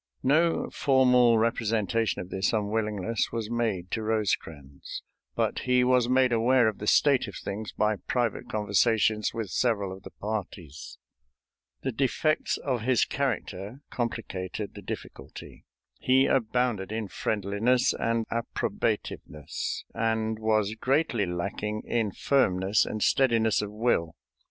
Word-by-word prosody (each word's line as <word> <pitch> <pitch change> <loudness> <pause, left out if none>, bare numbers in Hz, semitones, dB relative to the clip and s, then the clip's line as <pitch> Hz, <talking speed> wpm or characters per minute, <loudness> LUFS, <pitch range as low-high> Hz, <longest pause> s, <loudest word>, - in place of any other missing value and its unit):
No 160 +5 +2
formal 125 -3 +4
representation 115 -1 0
of 90 - -14
this 95 +2 0
unwillingness 105 0 -1
was 115 -1 -4
made 110 -7 -1
to 110 - -1
Rosecrans, 80 -10 -3 0.3
but - - 0
he 125 0 +2
was 125 -1 +3
made 130 -1 +4
aware 120 +1 +4
of 110 - -2
the 105 - -5
state 140 +1 +4
of - - -8
things 105 +2 -5
by 105 0 0
private 120 -4 -1
conversations 105 0 +2
with 110 -5 -5
several 100 -2 0
of 95 - -14
the - - -10
parties. 95 -8 -6 0.9
The 130 - -1
defects 140 +5 0
of 130 -5 -2
his 125 +2 +2
character 125 -3 -3
complicated 105 -4 -4
the - - -9
difficulty. - - -9 0.3
He 130 +1 +4
abounded 120 -5 0
in 110 -1 -3
friendliness 105 +6 +1
and 115 -1 -1
approbativeness, 95 - -3
and 110 -1 -1
was 110 -1 +1
greatly 130 - 0
lacking 105 +5 -3
in 115 -4 0
firmness 95 -6 +2
and 110 - -2
steadiness 115 -5 +3
of 105 -1 -5
will. 105 -7 0
110 Hz, 125 wpm, -27 LUFS, 100-125 Hz, 0.9 s, formal